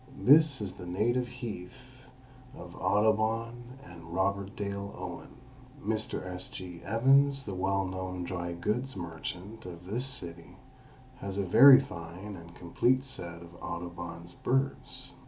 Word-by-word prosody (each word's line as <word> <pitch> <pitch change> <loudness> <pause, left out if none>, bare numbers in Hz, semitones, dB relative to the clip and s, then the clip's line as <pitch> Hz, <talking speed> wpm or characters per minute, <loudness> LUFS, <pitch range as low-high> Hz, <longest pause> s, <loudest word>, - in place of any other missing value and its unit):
This 145 -2 +7
is 95 -2 -4
the 90 - -8
native 120 +7 +1
heath 125 +2 -8 0.5
of 85 - -10
Audubon 110 +5 +1
and 85 - -10
Robert 100 +1 0
Dale 100 0 -4
Owen. - - -7 0.4
Mr. 110 -3 -2
S. 90 0 -5
G. 90 -2 -8
Evans, 135 +5 +4
the 100 - -4
well 95 +1 +1
known 95 -1 -4
dry 85 -1 -3
goods 115 +8 -2
merchant 90 +5 -6
of 90 0 -9
this 120 +8 -2
city, 85 -7 -8 0.6
has 100 0 -5
a 100 - +1
very 130 +9 +10
fine 90 -2 -7
and 85 -1 -12
complete 125 +9 +2
set 85 -10 -7
of 85 0 -13
Audubon's 85 0 -6
birds. 135 +6 -1
100 Hz, 135 wpm, -30 LUFS, 90-120 Hz, 0.6 s, very